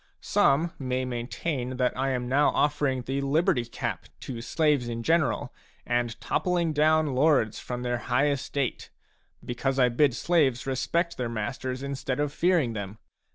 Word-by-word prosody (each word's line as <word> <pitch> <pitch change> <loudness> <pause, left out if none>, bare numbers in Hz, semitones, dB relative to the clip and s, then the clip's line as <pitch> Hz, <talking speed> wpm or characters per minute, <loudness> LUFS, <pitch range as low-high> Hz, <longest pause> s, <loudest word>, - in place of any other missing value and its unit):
Some 160 +5 +2
may 130 -1 -1
maintain 125 +2 -3
that 125 -1 +1
I 135 +1 0
am 125 -2 -2
now 140 +4 +3
offering 145 -3 +1
the 135 +2 -2
liberty 145 -1 +2
cap 115 - -4
to 120 -3 -6
slaves 145 -1 +1
in 115 0 -4
general 160 -3 +1 0.3
and 120 -2 -1
toppling 175 -3 0
down 155 -1 +3
lords 130 -5 +2
from 125 0 -5
their 120 -1 -1
high 125 +6 +1
estate, 140 -1 -3 0.6
because 130 +2 -2
I 125 -2 +4
bid 125 +1 +2
slaves 140 -4 +2
respect 135 +6 -1
their 125 -2 -2
masters 125 +4 -4
instead 135 -1 -3
of 145 -1 -1
fearing 165 -8 +2
them. 100 -1 -6
130 Hz, 155 wpm, -27 LUFS, 125-150 Hz, 0.6 s, I